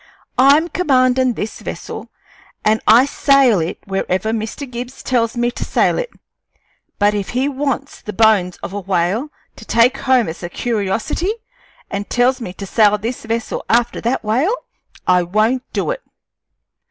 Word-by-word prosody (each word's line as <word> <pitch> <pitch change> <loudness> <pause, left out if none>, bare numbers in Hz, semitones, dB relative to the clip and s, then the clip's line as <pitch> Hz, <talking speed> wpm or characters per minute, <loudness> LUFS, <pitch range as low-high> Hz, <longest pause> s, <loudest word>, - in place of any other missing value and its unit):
I'm 285 +5 +6
commandin' 255 -7 +2
this 220 -1 -5
vessel, - - -7 0.6
and 220 +1 +3
I 235 +4 +7
sail 275 -6 +4
it 165 +1 -3
wherever 195 +1 -1
Mr. 225 +5 -4
Gibbs 245 +1 -7
tells 240 -1 0
me 240 0 +1
to - - -5
sail - - +1
it; - - -3 0.9
but 205 0 +3
if 205 -2 -3
he 255 +3 0
wants 280 -1 -3
the 210 - -6
bones 205 -4 +3
of - - -5
a 205 - -3
whale 195 - 0 0.3
to - - -11
take 230 +3 +3
home 255 -4 +2
as 160 - -6
a 175 - -5
curiosity, 225 - -1 0.6
an' 200 +1 -3
tells 250 +3 +1
me 205 - -5
to 195 - -7
sail 210 +1 +3
this 225 +3 -5
vessel 230 0 -3
after 235 +1 +2
that 235 +2 -1
whale, 260 - +1 0.5
I 180 0 +4
won't 215 +8 0
do - - -1
it." - - -4
230 Hz, 160 wpm, -18 LUFS, 205-260 Hz, 0.9 s, I